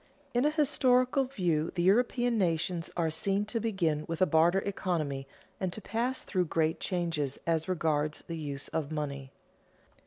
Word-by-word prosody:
_In 245 +4 +3
a - - +4
historical 270 -3 +3
view 175 - 0
the 175 - +1
European 240 +4 +3
nations 170 -3 0
are 165 -2 +1
seen 195 +5 0
to 230 +2 -2
begin 175 -9 0
with 165 -1 -3
a 185 - +5
barter 170 +3 +4
economy 155 -9 -2 0.3
and 185 -2 -1
to - - -5
pass 235 +5 -2
through 180 -2 0
great 160 0 0
changes 165 -6 -1
as 165 0 0
regards 155 -4 0
the 165 - -5
use 145 -2 -5
of 155 -2 -2
money. 140 -3 -4
175 Hz, 160 wpm, -30 LUFS, 155-215 Hz, 0.3 s, a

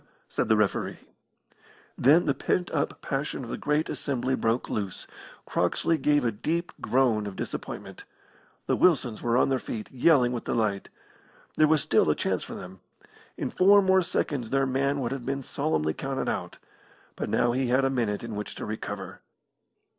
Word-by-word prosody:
said - - -1
the 110 - +6
referee. 105 -2 0 1.0
Then 155 +7 +5
the 140 - +2
pent 180 +5 -1
up 145 - -2
passion 135 0 -3
of 120 - -7
the - - -2
great 150 +1 +1
assembly 130 -2 -2
broke 115 -1 0
loose. 100 -3 -4 0.4
Croxley 165 -1 0
gave 145 -3 +2
a 115 - +2
deep 165 +11 -2
groan 120 -5 +2
of 100 - -7
disappointment. - - -6 0.6
The - - +1
Wilsons 130 -11 +2
were 120 0 +1
on - - +3
their 135 -1 +1
feet, 110 -2 -6
yelling 130 -2 +4
with 120 -2 -4
delight. 105 -4 -1 0.7
There 155 - +5
was 155 -2 +3
still - - +3
a - - +3
chance - - -1
for - - -8
them. 90 +1 -9 0.6
In - - -3
four 200 +2 +6
more 190 0 +4
seconds 145 -8 -2
their 135 0 +2
man 140 +2 0
would 120 -1 -2
have 135 -2 -4
been 135 +2 -3
solemnly 80 -7 -1
counted 135 +6 -3
out. - - -3 0.6
But - - -4
now 120 - +2
he 130 +1 0
had 130 +2 +3
a 135 - +1
minute 115 -6 -1
in 115 -2 -5
which 105 0 -5
to - - -5
recover. 105 -3 -6
130 Hz, 175 wpm, -27 LUFS, 110-145 Hz, 1.0 s, the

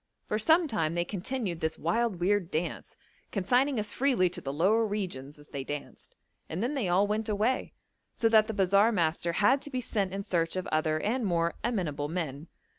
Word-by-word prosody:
For 215 - -1
some 320 +9 +4
time 165 - -1
they 175 0 0
continued 195 -1 -3
this 160 0 -2
wild 200 +3 0
weird 190 0 +1
dance, 170 +1 -4 0.3
consigning 245 +6 +2
us 210 0 -3
freely 245 -10 +2
to 180 0 -5
the 135 - -4
lower 195 +10 +3
regions 180 -10 -4
as 145 0 -15
they 140 -2 -4
danced, 145 +1 -8 0.3
and 175 +7 -3
then 255 +5 -1
they 250 -11 -1
all 185 +3 +4
went 215 +1 -1
away, 215 +5 0 0.4
so 230 - +1
that 215 -1 +5
the 220 - -3
bazaar 200 +3 +4
master 170 -3 0
had 210 +10 +3
to 290 - -7
be 255 -3 -2
sent 205 -6 -1
in 195 +1 -4
search 170 -4 0
of 185 - -2
other 155 0 +1
and 240 +4 0
more 170 -2 +1
amenable 175 -11 -1
men. 160 -3 -4
195 Hz, 195 wpm, -29 LUFS, 165-220 Hz, 0.4 s, that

